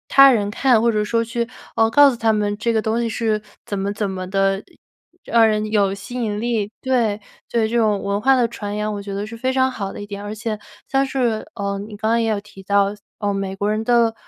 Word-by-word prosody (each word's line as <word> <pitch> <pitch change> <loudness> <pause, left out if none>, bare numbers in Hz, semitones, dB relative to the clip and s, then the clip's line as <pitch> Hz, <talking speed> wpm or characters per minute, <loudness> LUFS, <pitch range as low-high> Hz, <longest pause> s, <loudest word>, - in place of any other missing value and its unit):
他 275 0 +10
人 205 -4 +1
看， 245 +1 +3
或 235 - +3
者 210 -1 +1
说 230 +2 +1
去， 235 +1 -2 0.3
呃， 225 0 +4
告 290 +5 +7
诉 - - -4
他 225 -1 +2
们 205 -1 0
这 235 +1 +1
个 225 - +2
东 225 +2 0
西 230 - -1
是 220 -2 0 0.2
怎 200 -1 -3
么 200 +1 -1
怎 205 -1 -2
么 185 -1 -5
地 195 0 +1 0.6
让 230 -1 +5
人 215 -1 +1
有 200 -3 +3
吸 200 +5 -9
引 215 -4 -2
力。 220 -3 -1
对， 235 -6 +1 0.3
对 225 -2 +1
这 230 - -3
种 215 -3 +2
文 200 +1 -1
化 270 +3 +5
的 245 -2 +3
传 205 -3 -5
扬 210 0 -2
我 205 - -4
觉 200 0 -7
得 200 +1 -3
是 220 +2 -8
非 255 +3 -1
常 260 0 +2
好 200 -6 -4
的 - - -8
一 205 - -6
点。 205 0 -7
而 205 +1 -5
且 220 -1 -4 0.3
像 270 0 +2
是 245 -5 0
呃， 200 -1 -2
你 210 +1 -8
刚 220 +1 -1
刚 230 +1 +3
也 225 - 0
有 210 - 0
提 205 -2 -14
到， 200 +1 +2 0.3
呃， 205 -1 0
美 195 -1 -3
国 205 +2 0
人 215 +1 -1
的 235 -1 +3
215 Hz, 270 characters per minute, -21 LUFS, 205-230 Hz, 0.6 s, 他